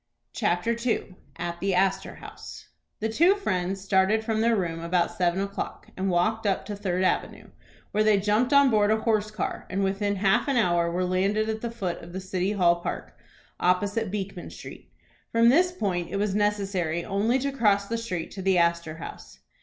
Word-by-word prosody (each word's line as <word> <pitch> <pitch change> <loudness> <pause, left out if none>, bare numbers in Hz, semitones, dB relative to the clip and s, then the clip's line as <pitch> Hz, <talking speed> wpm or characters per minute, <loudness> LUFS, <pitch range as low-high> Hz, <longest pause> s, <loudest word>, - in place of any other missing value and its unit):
CHAPTER 210 +2 0
II. 230 -5 -1 0.2
AT 170 0 -5
THE 195 -1 0
ASTOR 190 +1 0
HOUSE. - - -11 0.3
The 220 - +1
two 340 - +4
friends 190 - -2
started 195 +3 +2
from 220 -1 0
their 230 0 +3
room 170 -5 -2
about 170 +1 0
seven 175 0 +1
o'clock, 200 0 -5
and 190 +1 -1
walked 205 +5 +1
up 195 - 0
to 205 - -5
Third 185 -2 -1
Avenue, 185 - -1 0.4
where 215 +1 +2
they 215 -2 +4
jumped 210 +6 +1
on 280 -2 +6
board 210 -1 +3
a 220 0 +2
horse 215 -2 +1
car, 215 - -4
and 195 +1 -1
within 200 +1 0
half 200 +7 +2
an 275 -3 +1
hour 175 -6 +2
were 180 +2 -1
landed 200 +4 +1
at 220 0 -3
the 235 - -3
foot 195 -7 -4
of 170 +1 -11
the 190 - -3
City 185 +1 -2
Hall 175 -4 +3
Park, 170 - -6 0.4
opposite 200 +4 +1
Beekman 195 -2 -5
Street. - - -11 0.4
From 230 +1 +5
this 355 +8 +4
point 185 - -2
it 195 - -3
was 205 -1 0
necessary 195 -5 0
only 210 +5 +1
to 280 +1 -2
cross 205 -6 +2
the 230 - -2
street 180 -8 -4
to 195 - -7
the 190 -1 +2
Astor 170 -2 +1
House. - - -10
200 Hz, 195 wpm, -26 LUFS, 180-220 Hz, 0.4 s, on